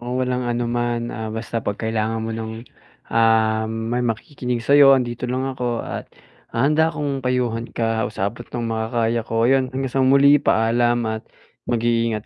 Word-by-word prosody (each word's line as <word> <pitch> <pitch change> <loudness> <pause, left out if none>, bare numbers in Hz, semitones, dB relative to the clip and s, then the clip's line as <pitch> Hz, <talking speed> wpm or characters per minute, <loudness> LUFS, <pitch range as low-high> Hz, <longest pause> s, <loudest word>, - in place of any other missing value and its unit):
Oo, 125 +1 -3
walang 125 0 -1
anuman, 120 0 -1
ah, 110 -1 -5
basta 115 +1 -4
'pag 105 0 -3
kailangan 110 0 -1
mo 115 - -3
ng, 110 +1 -6 0.5
ah, 110 -1 +3
may 115 +2 -2
makikinig 120 +1 -3
sa'yo 140 -1 +7
andito 120 -1 -3
lang 130 +1 -1
ako 120 -2 -3
at, - - -6 0.4
ah, 115 +4 0
handa 160 +2 +3
akong 145 -4 -3
payuhan 125 -2 -1
ka 115 -1 -1
sa 100 - -3
abot 120 +1 -11
nung 115 -2 -3
makakaya 115 +1 0
ko. 115 +1 0
Ayon, 130 0 +3
hanggang 130 -1 -3
sa 135 - +2
muli, 140 +2 +5
paalam 120 +1 +2
at 110 0 -3 0.5
mag-iingat 115 -2 0
120 Hz, 165 wpm, -21 LUFS, 115-125 Hz, 0.5 s, sa'yo